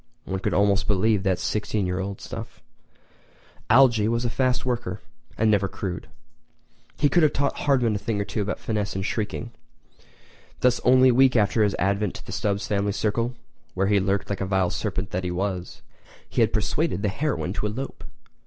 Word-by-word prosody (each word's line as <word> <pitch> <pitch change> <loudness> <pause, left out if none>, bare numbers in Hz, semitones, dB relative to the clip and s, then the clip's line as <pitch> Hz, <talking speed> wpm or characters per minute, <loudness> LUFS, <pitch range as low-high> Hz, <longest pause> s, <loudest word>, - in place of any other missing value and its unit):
One 95 - -3
could - - -1
almost 100 -1 +2
believe 105 0 +2
that 95 -2 +1
sixteen 105 +1 -1
year 90 +1 -2
old 95 +1 -4
stuff. - - -8 1.1
Algy 120 -4 +5
was 115 +1 0
a 120 - 0
fast 130 -1 0
worker, 120 -6 -2 0.4
but 110 - +2
never 100 -2 +3
crude. 95 -3 -5 0.9
He 145 - +3
could 175 +4 +3
have 155 - +4
taught 140 0 0
Hardman 125 -6 +2
a 105 - -1
thing 105 0 -2
or - - +1
two 100 +2 -3
about 105 +1 -2
finesse 105 -3 -2
in 95 - -2
sheiking. 110 +3 -3 1.1
Thus 125 -1 +3
only 130 +1 +6
a - - +4
week 130 +1 +5
after 110 0 +3
his 105 -1 +1
advent 100 +1 0
to - - -9
the - - -8
Stubbs 100 -1 -1
family 100 -1 0
circle, 115 +4 -1 0.4
where 95 +1 +1
he 100 0 +3
lurked 100 +1 -1
like 100 - -2
the 95 - -1
vile 95 -2 +1
serpent 95 -3 -3
that 90 +1 -2
he 90 - -2
was, 90 0 -3 0.4
he - - 0
had - - +3
persuaded 90 - 0
the 105 - +2
heroine 135 -5 -2
to 105 - -2
elope! 125 +6 -6
105 Hz, 190 wpm, -25 LUFS, 95-120 Hz, 1.1 s, only